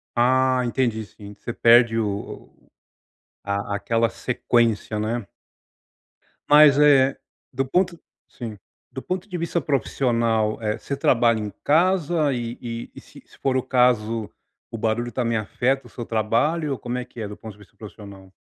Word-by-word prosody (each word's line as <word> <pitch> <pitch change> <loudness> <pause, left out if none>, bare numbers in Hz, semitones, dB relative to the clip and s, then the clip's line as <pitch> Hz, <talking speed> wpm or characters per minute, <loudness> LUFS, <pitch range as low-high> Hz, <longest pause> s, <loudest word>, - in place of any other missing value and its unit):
Ah 130 +1 +3
entendi 120 -3 -1
sim, 100 0 -13
você 120 - -7
perde 115 -1 +5
o 105 -2 -4 0.9
a 100 0 -2 0.2
a - - 0
aquela 115 +3 0
sequência 115 -3 0
né. 110 +1 -2 1.2
Mas 150 -1 +7
eh, 140 -2 +5 0.4
do 135 +2 -1
ponto 180 +5 0 0.3
sim, 115 -4 -8 0.3
do - - -6
ponto 185 +1 -4
de 180 - -4
vista 170 0 -1
profissional, 115 -5 0
eh, 105 -1 -1
você 140 - -5
trabalha 120 -4 +3
em 105 -1 -4
casa 165 -2 +2
e 120 -1 -4 0.4
e - - -10
se - - -16
se - - -21
for 135 -1 0
o 130 - -1
caso 115 -4 +1 0.4
o 115 - -6
barulho 115 +2 -1
está 125 +1 -2
me 115 0 0
afeta 125 +5 -1
o - - -17
seu 120 - -7
trabalho, 120 +9 0
ou 130 - -6
como 120 +3 -4
é 125 - -3
que 125 - -13
é 110 - -4
do 105 - -8
ponto 110 -1 -10
de - - -22
vista 105 - -19
profissional? 100 -3 -12
120 Hz, 165 wpm, -23 LUFS, 110-135 Hz, 1.2 s, Mas